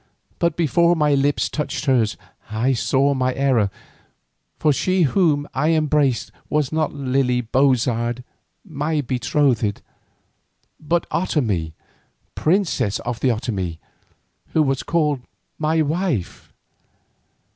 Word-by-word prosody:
But 170 -2 +1
before 170 +1 +3
my 150 -2 +2
lips 140 +1 +1
touched 150 -2 -3
hers 125 -6 +2 0.3
I 115 +5 +1
saw 135 +4 +2
my 130 -1 0
error, 130 -7 +2 0.9
for 150 - +2
she 185 +5 +1
whom 150 -2 +2
I 150 +5 +2
embraced 150 -5 +1 0.2
was 150 -3 0
not 155 -1 0
Lily 130 -2 0
Bozard, 125 -1 +1 0.4
my 155 -2 -1
betrothed, 125 -4 0 1.0
but 170 +2 -1
Otomie, 105 - -1 0.6
princess 155 - +1
of 120 -1 -4
the - - +1
Otomie, 100 -8 -2 0.8
who 160 - +4
was 135 -1 0
called 150 -5 0 0.4
my 160 +1 +2
wife. 155 - -2
140 Hz, 110 wpm, -21 LUFS, 125-155 Hz, 1.0 s, who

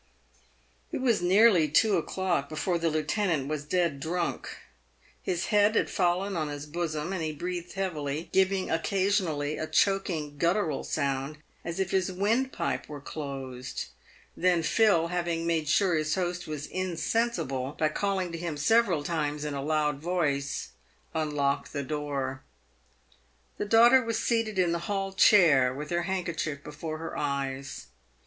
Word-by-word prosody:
It - - -2
was 235 -7 +2
nearly 185 -2 +5
two 200 +8 +3
o'clock 175 -4 -1
before 170 +3 -1
the 165 0 +1
lieutenant 155 -1 0
was 150 -1 -3
dead 170 -2 0
drunk. 170 +4 -2 0.7
His 175 -1 -2
head 210 +1 +4
had - - +1
fallen 185 +1 +1
on 155 -2 -1
his 145 0 -6
bosom, 160 +1 -3
and 185 - -2
he 155 -1 -1
breathed 175 +3 -5
heavily, 160 -5 -3
giving 190 0 +2
oc 165 0 +1
casionally 185 -7 0
a 155 - -2
choking, 165 -8 0
guttural 170 -3 +1
sound, 140 0 -2 0.3
as 170 +2 -5
if 190 0 -1
his 190 -1 +1
windpipe 220 +7 -1
were 150 -1 -6
closed. 135 -4 -6 0.5
Then 175 -2 +2
Phil, 170 -3 +3
having 170 -1 -1
made 165 -2 0
sure 190 +2 +3
his 155 -1 +1
host 180 -1 -2
was 150 -1 -4
insensible, 170 - -1
by 155 - +2
calling 190 +1 -1
to 165 - -5
him 165 -3 -4
several 185 -1 +3
times 150 -2 -2
in 150 - -3
a 140 - -3
loud 150 -1 0
voice, 145 - -1 0.4
unlocked 150 -3 -1
the 140 -2 -2
door. 140 -2 -3 1.2
The - - -1
daughter 235 +4 +6
was 230 -1 -1
seated 225 -3 0
in 180 -2 +3
the 170 - 0
hall 195 -1 -1
chair 160 -11 +6
with 150 +3 -6
her 175 0 +1
handkerchief 165 -6 -2
before 155 +1 -6
her 165 +1 -6
eyes. 135 -1 -3
165 Hz, 150 wpm, -28 LUFS, 150-190 Hz, 1.2 s, daughter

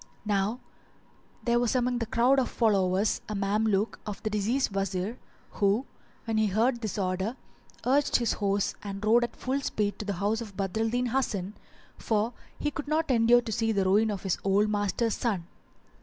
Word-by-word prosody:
Now 205 +3 0 0.8
there 240 0 +2
was 240 +1 +1
among 245 -1 +1
the 230 - -2
crowd 245 +4 +3
of 255 - 0
followers 200 -2 +2
a 210 - -3
Mameluke 205 +1 +1
of 210 -2 -7
the 215 - -1
deceased 215 +5 0
Wazir 195 +2 -2 0.3
who, 205 +5 +1 0.4
when 225 -2 0
he 215 - +3
heard 235 +5 +1
this 215 -2 -3
order, 190 +4 -1 0.5
urged 280 +3 +2
his 235 -2 +2
horse 200 -1 0
and 200 0 -5
rode 235 +3 +5
at 240 - -4
full 270 +2 -2
speed 205 -6 -1
to 210 - -4
the 200 - -1
house 205 +5 0
of 205 -4 -9
Badr 195 +1 -2
al 225 0 +1
Din 245 +2 0
Hasan; 220 -6 -1 0.5
for 220 +2 0 0.2
he 295 - -1
cold 290 +1 -5
not 310 -1 +1
endure 240 0 +5
to 225 - -5
see 225 0 +1
the 200 -3 +1
ruin 210 +4 +4
of 200 -3 -4
his 190 -3 -1
old 200 +2 +3
master's 205 +2 0
son. 200 -8 -1
215 Hz, 185 wpm, -28 LUFS, 200-240 Hz, 0.8 s, rode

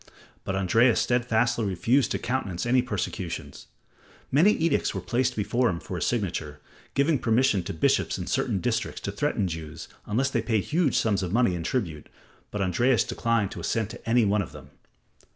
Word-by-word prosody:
But 95 - -3
Andreas 115 +6 +3
steadfastly 120 -1 +1
refused 115 +8 +2
to - - -1
countenance 120 -8 -2
any 125 +1 +3
persecutions. 100 -6 -5 0.6
Many 165 +10 +5
edicts 165 -9 0
were - - -1
placed 125 +6 0
before 120 +4 +1
him 85 - -2
for 90 - -7
his 90 - -1
signature, 85 -10 -2 0.4
giving 140 +1 +2
permission 115 -3 +2
to - - -3
bishops 80 - +1
in - - -4
certain 95 - -1
districts 120 -1 -2
to 100 - -3
threaten 115 0 -1
the 90 - -2
Jews 80 0 -7 0.2
unless 130 +6 0
they 120 - +1
paid 110 -3 0
huge 160 -4 +1
sums 100 -4 +1
of 90 -2 -3
money 120 -3 +3
in 85 - -3
tribute, 85 -5 -3 0.4
but 105 -1 -2
Andreas 120 +6 +2
declined 115 -4 0
to - - -7
assent 110 -1 -1
to 120 -1 -9
any 120 -1 +4
one 105 +1 +2
of 85 - -7
them. 70 -2 -12
110 Hz, 185 wpm, -26 LUFS, 95-125 Hz, 0.6 s, Many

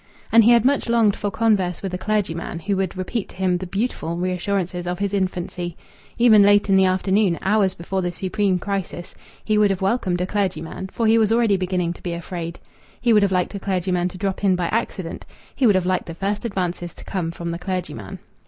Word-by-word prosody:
And 230 0 +7
he 225 - +5
had 235 -1 +5
much 275 -3 +2
longed 230 -3 +3
for 205 - -2
converse 200 -5 +1
with 190 -2 -4
a - - -1
clergyman, 185 -6 -2
who 200 +3 -1
would 190 -1 -2
repeat 190 +3 -3
to - - -14
him 180 -1 0
the 185 - -5
beautiful 180 -4 -2
reassurances 180 0 -2
of 180 0 -2
his 200 +1 -2
infancy. 180 -3 -2 0.4
Even 230 -3 +6
late 205 0 +5
in 195 - +5
the 190 0 +5
afternoon, 190 0 +2
hours 195 -2 +2
before 190 +3 -3
the 175 -1 -1
supreme 190 +2 0
crisis, 195 -2 -4 0.3
he 215 -1 +2
would 210 -1 +4
have 195 -2 -1
welcomed 190 -4 0
a 180 - 0
clergyman, 190 -3 -3
for 230 +4 -2
he 225 +1 +5
was 220 -1 +2
already 225 -3 +3
beginning 180 -2 -1
to - - -16
be 175 - -3
afraid. 170 -1 -5 0.4
He 240 -2 +3
would 210 - +5
have 200 -1 +2
liked 180 +1 0
a 200 - -4
clergyman 180 -2 0
to 185 - -8
drop 195 +1 -3
in 190 -2 +4
by 175 -2 -1
accident; 200 -6 -3 0.3
he 265 - +3
would 205 - +5
have 185 -1 +1
liked 185 -1 0
the 165 - -6
first 200 +5 -2
advances 180 -4 -3
to - - -13
come 180 -4 -3
from 170 0 -5
the 170 - -4
clergyman. 160 - -5
190 Hz, 220 wpm, -22 LUFS, 180-205 Hz, 0.4 s, And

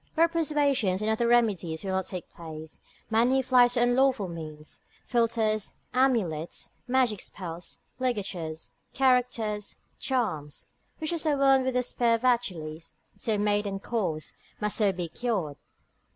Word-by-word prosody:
Where 330 +1 +5
persuasions 285 - +1
and 215 - +1
other 235 +2 +1
remedies 205 -9 +2
will 195 - -2
not 190 -1 0
take 180 -2 -6
place, 160 -1 -9 0.3
many 245 +4 +3
fly 250 -1 +6
to 245 0 0
unlawful 245 -3 +3
means, 155 -3 -7 0.3
philters, 225 -3 +1 0.2
amulets, 220 - 0 0.2
magic 245 -5 +2
spells, 170 -2 -6
ligatures, 190 -10 -3 0.2
characters, 245 -5 +1 0.2
charms, 215 - -2 0.3
which 315 +1 -2
as 325 -1 -1
a 295 -2 +3
wound 270 -1 +4
with 260 -1 -1
the 250 - +2
spear 235 -1 +2
of 230 - -5
Achilles, 170 -11 -1 0.2
if - - -21
so 220 -2 +1
made 205 0 +1
and 195 0 -4
caused, 180 -10 -2 0.3
must 210 -1 0
so 210 -3 +4
be 180 -2 -4
cured. 185 -7 -2
220 Hz, 145 wpm, -28 LUFS, 180-250 Hz, 0.3 s, fly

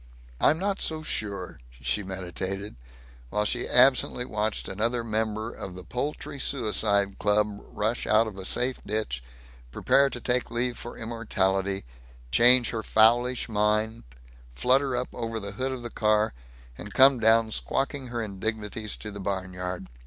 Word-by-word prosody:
"I'm 155 - +4
not 195 +2 -1
so 155 -1 -2
sure," 100 -9 -4 0.2
she 105 - 0
meditated, 95 +1 -5 0.5
while 105 +8 0
she - - -1
absently 125 -1 +4
watched 105 -2 -2
another 115 +5 -1
member 110 0 -2
of 95 -5 -8
the 90 - -9
Poultry 140 +4 -4
Suicide 105 -6 0
Club 105 0 +1
rush 110 +3 -2
out 110 +1 +5
of 110 -3 -6
a 95 - -7
safe 125 +6 -1
ditch, 105 - -3 0.5
prepare 140 - +3
to 125 - -6
take 125 +1 0
leave 120 +1 -1
for 120 - -8
immortality, 100 - -1 0.5
change 120 +1 +6
her 115 - -2
fowlish 120 +4 +3
mind, 110 +1 0 0.5
flutter 130 - +2
up 125 - -2
over 115 -1 -3
the 100 -1 -6
hood 130 +6 -2
of 130 -2 -5
the 120 - -6
car, 105 - +2 0.5
and 105 - -8
come 135 -1 +7
down 110 0 +4
squawking 135 +3 -2
her 120 -1 -3
indignities 105 +1 -4
to 105 - -8
the 100 - -8
barnyard. 95 -1 -4
110 Hz, 150 wpm, -27 LUFS, 100-125 Hz, 0.5 s, come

